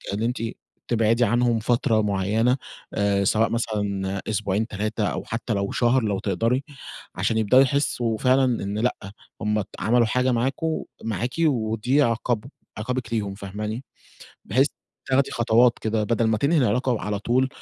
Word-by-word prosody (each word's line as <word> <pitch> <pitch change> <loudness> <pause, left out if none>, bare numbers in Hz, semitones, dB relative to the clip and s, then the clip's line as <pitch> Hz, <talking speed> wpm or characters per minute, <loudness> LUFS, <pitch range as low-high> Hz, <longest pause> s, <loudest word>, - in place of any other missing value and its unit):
اللي 110 +2 -1
أنتِ 120 -1 -2 0.5
تبعدي 115 +1 +3
عنهم 120 +1 +2
فترة 115 -1 +1
معيّنة، 105 +5 +1 0.4
آآ، 100 -1 +1
سواء 110 +3 +2
مثلًا 100 -4 -2
أسبوعين 105 0 0
3 105 0 -2
أو - - -3
حتى 115 +1 -3
لو 100 -1 -1
شهر 125 +1 +2
لو 100 -3 -1
تقدَري، 120 +6 0 0.5
عشان 110 - 0
يبدأوا 120 +5 +5
يحسوا 125 -5 0
فعلًا 130 +1 +3
إن 105 -4 -1
لأ، 125 +3 +1 0.5
هم 105 0 0
ت - - -13
عَمَلوا 120 +1 +3
حاجة 125 +3 +1
معاكم 135 +7 -1 0.2
معاكِ 115 +3 -2
ودي 120 +2 +1
عقابهم 115 0 -1 0.3
عقابِك 120 +1 -3
ليهم 100 -3 -1
فاهماني، 105 +5 -5 0.6
بحيث 130 +7 +2 0.4
تاخدي 135 +1 +2
خطوات 120 +1 +3
كده 110 -1 0
بدَل 115 +1 +1
ما 110 -1 +1
تنهي 155 +5 +2
العلاقة 125 0 +1
على 105 -1 -2
طُول 130 +5 +1
115 Hz, 150 wpm, -24 LUFS, 105-125 Hz, 0.6 s, يبدأوا